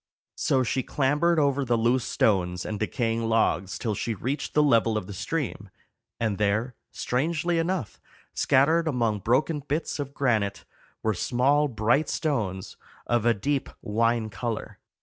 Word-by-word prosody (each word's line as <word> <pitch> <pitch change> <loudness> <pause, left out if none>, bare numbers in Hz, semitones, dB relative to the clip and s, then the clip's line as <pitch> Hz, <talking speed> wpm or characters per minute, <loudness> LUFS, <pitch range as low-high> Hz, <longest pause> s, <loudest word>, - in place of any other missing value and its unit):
So 130 -1 +1
she 125 +2 0
clambered 150 +6 +1
over 140 -2 +2
the 120 -2 +1
loose 120 +2 +2
stones 90 -4 +1
and 105 -1 -4
decaying 115 0 -1
logs 105 -4 +1
till 110 -3 -2
she 115 +3 -2
reached 130 +9 -3
the 150 - +5
level 115 -5 +3
of 100 - -3
the 100 - -8
stream, 110 - -3 0.5
and 110 -3 -1
there, 105 +5 +1 0.2
strangely 165 +6 -1
enough, 165 - -2 0.3
scattered 160 +5 +3
among 115 -7 0
broken 135 - +1
bits 145 +2 -3
of 140 0 -5
granite, 110 -7 0 0.4
were 110 - +2
small 135 +9 +2
bright 115 +5 +1
stones 110 - -2 0.3
of 120 -1 +1
a 120 - +4
deep 140 +7 -1
wine 115 +1 +1
color. 110 +3 -4
120 Hz, 150 wpm, -26 LUFS, 110-145 Hz, 0.5 s, the